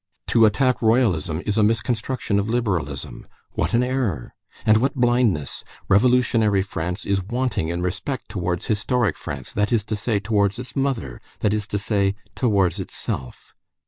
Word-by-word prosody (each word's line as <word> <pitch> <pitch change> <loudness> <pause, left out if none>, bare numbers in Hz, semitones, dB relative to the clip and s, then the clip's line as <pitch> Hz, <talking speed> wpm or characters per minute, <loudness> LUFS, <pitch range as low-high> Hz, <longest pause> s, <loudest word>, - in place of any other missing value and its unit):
To 115 -1 +6
attack 130 +4 +1
Royalism 95 - +2
is 105 +1 +1
a - - +5
misconstruction 110 0 0
of 100 +2 -2
liberalism. 90 - -2 0.2
What - - -1
an 120 - +3
error! 125 - -2 0.3
And 110 0 +6
what 135 +5 +1
blindness! 120 - +1 0.3
Revolutionary 110 -2 +3
France 90 +1 -4
is 100 -1 +1
wanting 120 -3 -1
in 85 +1 -2
respect 105 +9 -3
towards 90 -4 -2
historic 110 -1 +1
France, 65 -3 -6
that 105 +2 0
is 115 -4 +2
to 110 - -3
say, 105 0 0
towards 100 0 +1
its 125 0 -8
mother, 130 - -2 0.2
that 105 - +2
is 105 -1 -2
to 105 - -2
say, 100 -1 +1 0.2
towards 100 -6 +1
itself. 65 -8 -5
105 Hz, 155 wpm, -23 LUFS, 95-120 Hz, 0.3 s, To